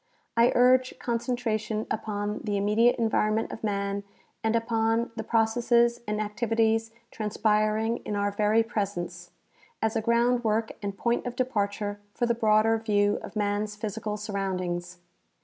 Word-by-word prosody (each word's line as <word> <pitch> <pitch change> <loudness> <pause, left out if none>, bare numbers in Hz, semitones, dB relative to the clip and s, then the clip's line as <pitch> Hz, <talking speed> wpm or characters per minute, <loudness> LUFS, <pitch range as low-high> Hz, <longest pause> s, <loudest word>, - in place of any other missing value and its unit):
I 230 +1 +5
urge 255 +1 +4
concentration 230 -3 -2
upon 210 -1 -2
the 205 -2 -1
immediate 210 +4 +3
environment 220 -1 +1
of 225 - -8
man 200 -1 -1 0.4
and 220 +1 +1
upon 230 0 +1
the 220 - -4
processes 235 +2 +2
and 210 0 -1
activities 225 +1 +1 0.2
transpiring 215 +1 +1
in 210 - -5
our 205 0 0
very 210 +2 +3
presence, 180 -6 -4 0.5
as 220 0 0
a 225 - +1
groundwork 235 -1 +2
and 200 -1 -4
jDoint 235 +3 0
of 245 - -5
departure 205 -4 -1 0.2
for 240 - +1
the 235 - +2
broader 220 0 +3
view 205 -2 +2
of - - -9
man's 210 0 -1
physical 210 0 -4
surroundings. 185 -4 -3
220 Hz, 135 wpm, -27 LUFS, 205-230 Hz, 0.5 s, I